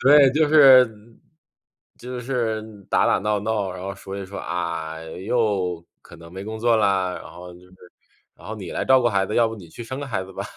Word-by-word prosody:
对， 140 0 +6
就 155 +1 +3
是 135 -5 +7 1.1
就 125 0 -7
是 115 -4 -2 0.3
打 - - +3
打 - - +3
闹 105 0 -1
闹， 105 -3 -2
然 90 0 -8
后 100 0 -5
说 95 0 -8
一 95 - -6
说： 100 +1 -8
“啊， 85 -2 -4
又 95 -1 -2 0.2
可 - - -15
能 85 0 -14
没 95 +2 -8
工 110 +1 -6
作 115 0 +3
啦”， 95 -4 +1
然 - - -11
后 90 0 -11
就 90 - -16
是 90 0 -20 0.6
然 - - -15
后： - - -5
“你 - - -8
来 - - -2
照 130 0 +5
顾 120 - +2
孩 100 -3 +1
子， 105 - -5
要 115 -1 +3
不 115 - -7
你 90 -5 -12
去 120 - -9
生 130 +4 -6
个 145 - -5
孩 105 -7 -3
子 95 - -11
吧。” - - -5
105 Hz, 245 characters per minute, -23 LUFS, 90-120 Hz, 1.1 s, 是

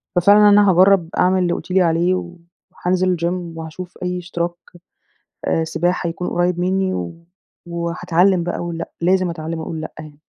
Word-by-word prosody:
ففعلًا 205 +4 +6
أنا 205 0 +6
هاجرب 185 -1 +4
أعمل 185 +1 +3
اللي 175 -1 +1
قلتِ - - -6
لي 190 +1 +4
عليه، 170 +1 +2
و 175 -1 -6 0.4
حانزل 185 0 0
الGym 170 0 -3
وهاشوف 165 +3 -8
أي 180 0 -2
اشتراك 175 0 -3 1.1
سباحة 175 +2 -1
يكون 170 +2 -4
قريب 175 0 0
مني، 190 +1 0
و 90 -1 -4 0.5
وحاتعلم 175 +2 +1
بقى 175 - -2
أقول 170 -1 -5
لأ، - - -6
لازم 185 +1 +2
أتعلم 165 0 -5
أقول 160 0 -5
لأ 155 - -7
يعني. 155 -2 -11
175 Hz, 165 wpm, -19 LUFS, 170-185 Hz, 1.1 s, ففعلًا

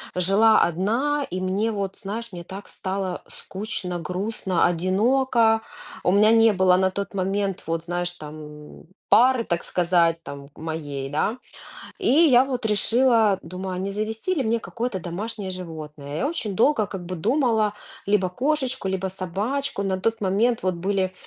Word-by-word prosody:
жила 200 +5 +4
одна, 235 - +1
и 185 - -3
мне, 195 +4 0
вот 195 -2 -3
знаешь, 225 +3 -6
мне 175 -2 -7
так 190 +3 -9
стало 190 -1 -4
скучно, 190 -3 -5
грустно, 185 +1 -1
одиноко. 225 +6 +2 0.4
У - - +3
меня 210 +3 +5
не 225 0 +6
было 185 -1 +4
на 190 0 +2
тот 200 +2 -4
момент, 195 0 -1
вот, 165 0 -2
знаешь, 175 0 -2
там, 150 -2 -11 0.3
пары, 250 0 +5
так 170 -5 -2
сказать, 170 -2 +2
там, 140 0 -9
моей, 150 -4 -5
да. 155 - 0 0.6
И 390 - -4
я 265 -3 +6
вот 255 -4 -2
решила, 225 -1 +3
думаю: 185 +3 -5
"А - - -4
не 195 +2 -2
завести 220 - -2
ли 295 - 0
мне 230 +1 +1
какое-то 230 -3 -4
домашнее 195 +4 -5
животное?" 155 -5 -7
Я - - 0
очень 220 - -3
долго 225 +2 +3
как 190 -2 -7
бы 185 +1 -4
думала: 225 - +2 0.3
либо 200 -2 +2
кошечку, 260 +1 -1
либо 190 0 -1
собачку. 200 +8 -3
На 190 -1 -1
тот 225 +3 0
момент 215 +5 +1
вот 185 0 0
были 185 +1 -1
195 Hz, 160 wpm, -24 LUFS, 180-225 Hz, 0.6 s, не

